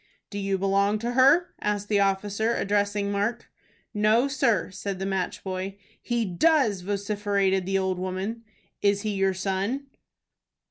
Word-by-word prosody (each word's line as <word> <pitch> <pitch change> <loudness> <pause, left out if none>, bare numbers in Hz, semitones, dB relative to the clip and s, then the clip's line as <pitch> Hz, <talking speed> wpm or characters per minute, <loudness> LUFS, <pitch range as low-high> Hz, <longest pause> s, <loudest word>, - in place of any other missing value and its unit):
"Do 205 - -4
you 195 -1 0
belong 200 +2 +2
to 235 +3 -3
her?" 275 +8 +4
asked 205 -1 -1
the 205 -1 +2
officer, 200 +3 +1
addressing 205 0 0
Mark. 210 +4 -2 0.4
"No, 215 +5 +3
sir," 235 - +1
said 195 0 -4
the 190 - -3
match 190 -2 -2
boy. 190 +1 -4 0.2
"He 235 -2 -1
does," 215 - +2
vociferated 200 -1 0
the 195 0 +1
old 190 -1 -1
woman. 190 +5 -4 0.4
"Is 200 0 +2
he 215 - -2
your 195 -1 +1
son?" 195 +8 -2
200 Hz, 145 wpm, -26 LUFS, 195-220 Hz, 0.4 s, her